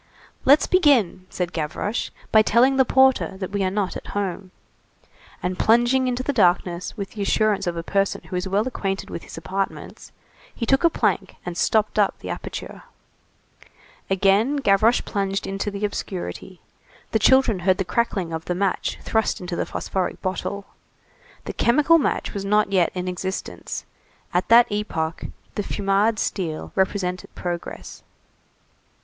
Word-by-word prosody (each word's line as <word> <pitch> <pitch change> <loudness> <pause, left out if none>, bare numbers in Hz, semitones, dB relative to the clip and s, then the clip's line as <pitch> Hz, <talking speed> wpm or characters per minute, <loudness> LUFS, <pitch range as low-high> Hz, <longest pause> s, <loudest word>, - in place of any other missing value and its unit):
"Let's 285 +3 +6
begin," 255 - +3
said 180 -2 -3
Gavroche, 165 +8 -2 0.2
"by 220 - +7
telling 250 +5 +4
the 265 - +5
porter 265 -6 +3
that 190 -1 -5
we 200 -1 -1
are 185 - +1
not 195 -1 -2
at - - -7
home." 195 -1 -3 0.9
And 180 0 -2
plunging 240 +3 +3
into 250 0 -1
the 285 - -1
darkness 180 -3 +1
with 200 -1 -5
the 210 - -7
assurance 210 0 +1
of 170 -1 -2
a 165 - -3
person 195 +2 0
who 185 - -7
is 180 +1 -2
well 200 +5 +1
acquainted 195 -6 -3
with - - -5
his - - -11
apartments, 190 +4 -5 0.4
he 230 - -3
took 270 +6 +2
a 335 - +6
plank - - -1
and 175 -1 -4
stopped 215 +4 +1
up 205 - +2
the - - -6
aperture. - - -7 1.3
Again 195 +8 +3
Gavroche 225 -3 +3
plunged 195 0 -2
into 195 +1 -3
the 200 +1 -3
obscurity. 185 -2 -5 0.5
The 220 - +2
children 260 -3 +4
heard 185 +1 +2
the 190 - -1
crackling 190 -5 -1
of 160 0 -4
the 180 - -2
match 195 +1 -1
thrust 220 -1 0
into 180 -1 -5
the - - -2
phosphoric 190 -2 -3
bottle. 195 +2 -3 0.8
The - - -4
chemical 300 +7 +4
match - - -1
was 200 - -4
not 210 0 +2
yet 180 -4 +3
in 180 0 -3
existence; 185 +1 -5 0.5
at 180 +1 +1
that 235 +2 +7
epoch 170 -6 -2 0.3
the - - -2
Fumade 205 +2 +1
steel 170 -7 -3
represented 190 -1 -1
progress. 175 -1 -6
195 Hz, 155 wpm, -23 LUFS, 185-225 Hz, 1.3 s, by